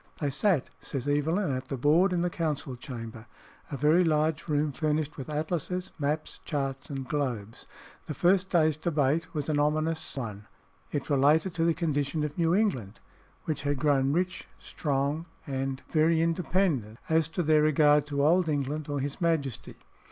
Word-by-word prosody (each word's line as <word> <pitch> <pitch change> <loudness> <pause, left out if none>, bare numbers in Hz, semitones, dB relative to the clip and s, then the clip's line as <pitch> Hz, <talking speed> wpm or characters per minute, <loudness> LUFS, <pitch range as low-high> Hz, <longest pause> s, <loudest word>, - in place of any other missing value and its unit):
They 145 -3 -1
sat, 170 - +1
says 135 -1 -5
Evelyn, 150 +5 +1
at 130 0 -3
the 135 - -3
board 160 +9 +4
in 175 -1 +1
the 175 0 0
council 150 -6 -2
chamber, 115 -2 -8 0.4
a 140 - -3
very 155 +6 +4
large 155 -1 +1
room 150 -1 +1
furnished 150 +1 -1
with 135 +1 -7
atlases, 175 +4 -2
maps, 150 +2 -2
charts, 135 -3 -3
and 135 -3 -5
globes. 125 -7 -3 0.4
The 150 - -4
first 185 +5 +3
day's 155 -3 +3
debate 155 0 0
was 150 -2 -2
an 150 -2 +1
ominous 155 +1 0
one: 105 -5 -5 0.4
it 145 +1 -3
related 150 +6 +3
to 165 0 0
the 165 -1 +2
condition 150 -2 -1
of 150 -1 -3
New 170 0 +2
England, 130 - 0 0.5
which 155 -3 -2
had 145 0 -1
grown 140 -1 +2
rich, 180 +3 -1
strong, 145 +3 -2 0.2
and 135 -2 -3
"very 160 +1 +3
independent 165 - 0
as 160 -1 +2
to 170 +2 -2
their 155 -1 +4
regard 150 -1 +4
to 140 -1 0
Old 170 +2 +3
England 145 +1 -2
or 145 -1 -1
his 140 +4 -4
majesty. 155 -7 -1
150 Hz, 165 wpm, -28 LUFS, 140-165 Hz, 0.5 s, board